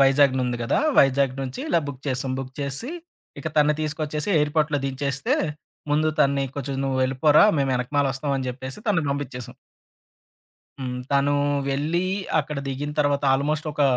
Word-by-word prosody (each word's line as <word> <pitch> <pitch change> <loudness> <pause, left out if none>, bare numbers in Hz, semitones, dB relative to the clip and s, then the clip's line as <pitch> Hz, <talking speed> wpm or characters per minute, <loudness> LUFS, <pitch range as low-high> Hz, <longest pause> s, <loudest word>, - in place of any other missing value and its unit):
వైజాగ్ 135 0 +5
నుంది 125 -1 -1
కదా! 115 - +1 0.2
వైజాగ్ 135 -1 +4
నుంచి, 130 -1 -5
ఇలా 170 - +3
బుక్ 135 -2 -7
చేసాం. 130 0 -1
బుక్ 130 -1 -6
చేసి, 140 - -2 0.5
ఇక 140 - -7
తనని 150 0 +4
తీసుకొచ్చేసి, 150 +2 -2
ఎయిర్‌పోర్ట్‌లో 150 0 +1
దించేస్తే, 135 0 -1 0.6
ముందు 155 +1 +3
తనని 140 -1 +3
కొంచెం 140 0 -3
నువ్వెళ్ళిపోరా, 135 +3 +3 0.2
మేము 135 -1 +1
ఎనకమాల 140 +3 0
ఒస్తాం 140 +1 -2
అని 130 -1 -3
జెప్పేసి, 130 +4 -6
తన్ను 180 -6 +2
బంపించేసాం. 125 -4 -5 1.3
హ్మ్. 125 -1 -3
తను 140 +1 +3 0.3
వెళ్ళి, 155 +6 0 0.3
అక్కడ 150 -1 -5
దిగిన 145 +2 -3
తర్వాత 145 -1 +1
ఆల్మోస్ట్ 150 +3 -1
ఒక 145 - 0
140 Hz, 145 wpm, -24 LUFS, 130-150 Hz, 1.3 s, వైజాగ్